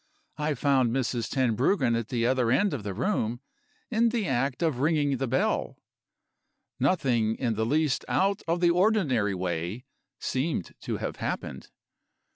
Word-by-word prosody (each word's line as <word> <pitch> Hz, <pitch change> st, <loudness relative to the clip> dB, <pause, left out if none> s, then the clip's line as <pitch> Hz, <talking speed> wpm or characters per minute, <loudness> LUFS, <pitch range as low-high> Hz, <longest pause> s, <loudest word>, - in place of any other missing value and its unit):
I 150 Hz, 0 st, 0 dB
found 135 Hz, -4 st, +2 dB
Mrs. 120 Hz, -2 st, -1 dB
Tenbruggen 130 Hz, -, +2 dB
at 115 Hz, -2 st, -2 dB
the 115 Hz, -1 st, -1 dB
other 125 Hz, -1 st, +2 dB
end 195 Hz, -, +2 dB
of 135 Hz, -, -3 dB
the 100 Hz, -2 st, -5 dB
room, 120 Hz, -, -1 dB, 0.5 s
in 230 Hz, 0 st, +3 dB
the 225 Hz, -3 st, -1 dB
act 135 Hz, +3 st, 0 dB
of 155 Hz, -7 st, 0 dB
ringing 145 Hz, -2 st, +2 dB
the 135 Hz, -, -2 dB
bell. 130 Hz, +3 st, 0 dB, 1.0 s
Nothing 120 Hz, -11 st, +2 dB
in 120 Hz, -4 st, 0 dB
the 110 Hz, +1 st, -1 dB
least 150 Hz, +1 st, +1 dB
out 195 Hz, +1 st, +1 dB
of 170 Hz, +2 st, 0 dB
the 175 Hz, -1 st, +5 dB
ordinary 170 Hz, -, +2 dB
way 90 Hz, +5 st, -3 dB, 0.3 s
seemed 130 Hz, -, -2 dB
to -, -, -3 dB
have -, -, -4 dB
happened. -, -, -4 dB
130 Hz, 150 wpm, -27 LUFS, 115-160 Hz, 1.0 s, the